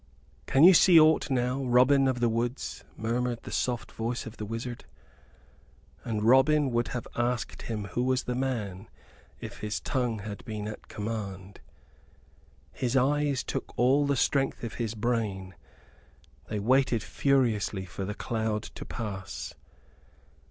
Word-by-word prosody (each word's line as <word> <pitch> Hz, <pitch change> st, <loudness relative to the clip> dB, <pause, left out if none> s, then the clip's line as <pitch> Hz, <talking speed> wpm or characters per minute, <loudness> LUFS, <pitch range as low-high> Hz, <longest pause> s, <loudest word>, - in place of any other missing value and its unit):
"Can 135 Hz, -, +4 dB
you 185 Hz, +3 st, +10 dB
see 175 Hz, 0 st, +7 dB
aught 155 Hz, 0 st, +4 dB
now, 130 Hz, +1 st, 0 dB
Robin 130 Hz, +2 st, +4 dB
of 125 Hz, -2 st, -1 dB
the 120 Hz, -, +4 dB
Woods?" 115 Hz, +3 st, -2 dB
murmured 120 Hz, +1 st, -2 dB
the -, -, -8 dB
soft 120 Hz, -2 st, -2 dB
voice 115 Hz, +2 st, -3 dB
of 115 Hz, -1 st, -9 dB
the 105 Hz, -, -5 dB
wizard, 115 Hz, +2 st, -5 dB, 1.2 s
and 110 Hz, -3 st, -2 dB
Robin 135 Hz, +4 st, +4 dB
would 120 Hz, 0 st, +1 dB
have 125 Hz, -, -5 dB
asked 120 Hz, 0 st, -1 dB
him 110 Hz, -3 st, -4 dB
who 120 Hz, -, -2 dB
was 130 Hz, 0 st, +1 dB
the 125 Hz, -, -3 dB
man, 115 Hz, -7 st, -3 dB, 0.5 s
if -, -, -8 dB
his 105 Hz, -1 st, -3 dB
tongue 125 Hz, -4 st, -1 dB
had 105 Hz, 0 st, -7 dB
been 105 Hz, -1 st, -5 dB
at 110 Hz, -, -8 dB
command. 100 Hz, -3 st, -5 dB, 1.1 s
His 125 Hz, +1 st, -1 dB
eyes 140 Hz, +1 st, +2 dB
took -, -, -5 dB
all 135 Hz, +4 st, +4 dB
the 140 Hz, -, +2 dB
strength 135 Hz, 0 st, +1 dB
of 115 Hz, -, -4 dB
his 115 Hz, -1 st, -2 dB
brain. 105 Hz, -5 st, -2 dB, 0.9 s
They 105 Hz, -, -3 dB
waited 125 Hz, +1 st, +2 dB
furiously 110 Hz, -8 st, +1 dB
for 95 Hz, +2 st, -6 dB
the 105 Hz, +2 st, -4 dB
cloud 110 Hz, -2 st, -2 dB
to -, -, -9 dB
pass. 100 Hz, -5 st, -6 dB
120 Hz, 145 wpm, -28 LUFS, 105-130 Hz, 1.2 s, you